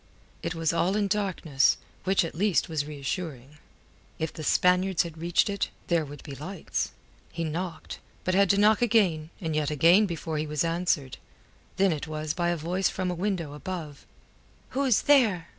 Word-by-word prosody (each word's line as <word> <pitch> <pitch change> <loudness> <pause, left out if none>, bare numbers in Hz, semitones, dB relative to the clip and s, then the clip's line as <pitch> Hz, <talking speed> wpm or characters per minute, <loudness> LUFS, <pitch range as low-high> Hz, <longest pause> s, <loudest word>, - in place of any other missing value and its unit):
It 165 - -3
was 165 0 0
all 180 +3 +1
in 210 -1 +1
darkness, 185 -9 +1 0.3
which 190 -2 +3
at 165 - -6
least 195 +2 +1
was 150 -3 -2
reassuring. 150 -1 -5 0.6
If 160 -1 -3
the 160 - -7
Spaniards 180 +3 +3
had 170 -2 -8
reached 170 +1 +2
it, 200 -1 -1 0.2
there 170 -2 +3
would 145 -1 -10
be 145 - -8
lights. 160 +7 -4 0.4
He 165 0 -3
knocked, 165 +1 -4 0.2
but 185 - 0
had 195 0 +4
to 200 - +4
knock 210 +2 +4
again 190 -10 +2
and 160 -4 -3
yet 150 -1 +1
again 170 +8 +5
before 160 -2 -3
he 155 - -2
was 150 0 0
answered. 165 -5 -1 0.6
Then 195 -1 +4
it 155 0 -3
was 155 0 -3
by 175 -1 0
a 175 - 0
voice 180 +5 0
from 185 -1 -2
a - - -1
window 175 -5 -2
above. 155 -2 -7 0.6
"Who 275 +2 -1
is 250 -5 +3
there?" 220 - +4
170 Hz, 180 wpm, -27 LUFS, 155-190 Hz, 0.6 s, again